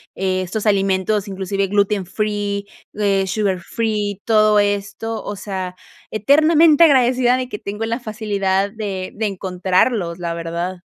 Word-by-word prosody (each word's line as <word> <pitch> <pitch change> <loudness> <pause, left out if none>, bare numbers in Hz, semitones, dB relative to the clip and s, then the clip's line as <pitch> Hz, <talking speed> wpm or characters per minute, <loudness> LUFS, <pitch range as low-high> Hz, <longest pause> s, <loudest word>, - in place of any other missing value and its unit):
eh, 185 -1 -1
estos 195 +4 -4
alimentos, 195 0 +1
inclusive 195 0 -2
gluten-free, 205 +1 -1 0.3
eh, 200 -2 +1
sugar-free, 205 +1 -1
todo 215 -1 +4
esto, 205 +2 -1
o 205 - -5
sea, 190 -2 -5 0.3
eternamente 310 +7 +5
agradecida 255 -3 +4
de 255 -1 -4
que 210 - -6
tengo 210 +3 -4
la 230 +3 -2
facilidad 200 -3 -1
de 195 -4 -5
de 220 - -2
encontrarlos, 185 0 0
la 170 -1 -3
verdad. 170 +2 -4
205 Hz, 125 wpm, -19 LUFS, 190-220 Hz, 0.3 s, eternamente